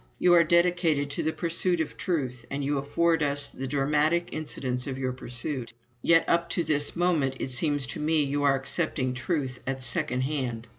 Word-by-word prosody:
You 180 - +4
are 170 -1 +7
dedicated 170 -4 +2
to - - -2
the 160 - 0
pursuit 170 +1 0
of 160 - -2
Truth, 125 -9 -2
and 140 0 -3
you 145 0 +1
afford 165 +4 +1
us 145 -1 0
the 135 - -6
dramatic 150 +5 +1
incidents 130 -5 -3
of 130 -1 -3
your 130 -1 -2
pursuit. 125 0 -4 0.3
Yet 165 +5 +4
up 170 0 +2
to 170 - +2
this 145 -2 0
moment 165 -7 +1
it 130 - -3
seems 145 +1 0
to - - -6
me 155 0 +2
you 145 +1 -1
are 140 -1 +4
accepting 135 -1 -1
Truth 130 -1 -2
at 135 -1 -2
second 125 +1 -1
hand. 130 -5 -3
145 Hz, 190 wpm, -27 LUFS, 130-165 Hz, 0.3 s, are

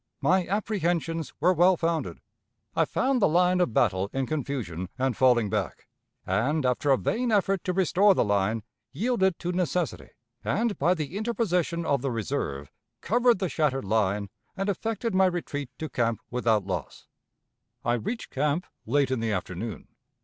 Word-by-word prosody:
My 185 0 +2
apprehensions 175 -5 -1
were 180 +5 +4
well 180 +1 +4
founded. 165 -1 -2 0.5
I - - +3
found 260 -2 0
the - - +5
line 180 +2 +3
of 175 - +1
battle 100 -4 +1
in 135 0 -1
confusion 125 - -3
and 130 -2 0
falling 125 -4 +4
back, - - -3 0.4
and, 130 - 0
after 125 +3 +1
a 135 - +5
vain 240 - -1
effort 195 -3 +2
to 185 - +1
restore 190 +2 +4
the - - +2
line, 105 +2 +1 0.3
yielded 190 - +1
to 175 - -3
necessity, 180 -2 -1 0.3
and, 225 -1 0
by 175 +6 +3
the 155 +1 -5
interposition 180 -7 0
of 140 -4 +1
the 135 - -1
reserve, 105 - -3 0.3
covered 240 +3 +3
the 190 0 -1
shattered 145 -7 0
line 100 -1 0 0.3
and 195 +1 -1
effected 225 +3 -2
my 190 0 +5
retreat 145 -6 -3
to 160 - -4
camp 115 -5 0
without 115 -5 +1
loss. 90 -8 -5 0.8
"I 120 - +2
reached 175 - -3
camp 150 +5 0 0.2
late 140 +2 +2
in 130 - 0
the 115 -1 -1
afternoon. 95 +2 -4
155 Hz, 160 wpm, -27 LUFS, 115-185 Hz, 0.8 s, the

